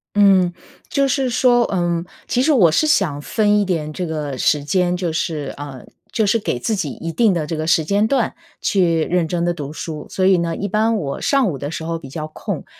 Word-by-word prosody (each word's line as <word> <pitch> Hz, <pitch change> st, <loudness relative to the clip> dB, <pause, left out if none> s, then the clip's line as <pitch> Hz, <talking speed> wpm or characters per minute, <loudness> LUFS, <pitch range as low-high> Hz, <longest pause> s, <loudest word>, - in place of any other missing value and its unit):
嗯， 195 Hz, -3 st, +5 dB, 0.4 s
就 275 Hz, -1 st, +2 dB
是 265 Hz, 0 st, 0 dB
说， 245 Hz, 0 st, +4 dB
呃， 175 Hz, -3 st, -1 dB, 0.2 s
其 250 Hz, -, +1 dB
实 300 Hz, +4 st, +3 dB
我 190 Hz, -, +5 dB
是 310 Hz, -, +2 dB
想 160 Hz, -, +1 dB
分 210 Hz, +4 st, +2 dB
一 -, -, +2 dB
点 160 Hz, -5 st, -2 dB
这 180 Hz, -, -3 dB
个 150 Hz, -4 st, -4 dB
时 145 Hz, +2 st, +2 dB
间， 180 Hz, +3 st, +1 dB
就 175 Hz, -3 st, -2 dB
是， 155 Hz, -2 st, -2 dB
呃， 140 Hz, -3 st, -8 dB, 0.3 s
就 220 Hz, -, +1 dB
是 220 Hz, +3 st, +2 dB
给 200 Hz, -, -2 dB
自 215 Hz, -, -1 dB
己 160 Hz, -7 st, -2 dB
一 165 Hz, +4 st, -5 dB
定 220 Hz, +2 st, +3 dB
的 155 Hz, -, -1 dB
这 160 Hz, -, -3 dB
个 155 Hz, 0 st, -3 dB
时 165 Hz, -2 st, +3 dB
间 205 Hz, +4 st, +2 dB
段 250 Hz, -2 st, 0 dB, 0.2 s
去 170 Hz, -5 st, +2 dB
认 175 Hz, 0 st, 0 dB
真 170 Hz, 0 st, -1 dB
地 175 Hz, -, +1 dB
读 145 Hz, -4 st, -6 dB
书。 155 Hz, -1 st, -6 dB
所 185 Hz, -, 0 dB
以 190 Hz, -1 st, +5 dB
呢， 170 Hz, -1 st, -1 dB
一 200 Hz, -, -3 dB
般 220 Hz, +3 st, +1 dB
我 140 Hz, -8 st, -4 dB
上 275 Hz, -4 st, +2 dB
午 140 Hz, -, -6 dB
的 145 Hz, -, -4 dB
时 165 Hz, -, -5 dB
候 165 Hz, 0 st, -3 dB
比 135 Hz, -, -10 dB
较 155 Hz, +3 st, -5 dB
空， 155 Hz, -, -5 dB
175 Hz, 250 characters per minute, -20 LUFS, 155-210 Hz, 0.4 s, 嗯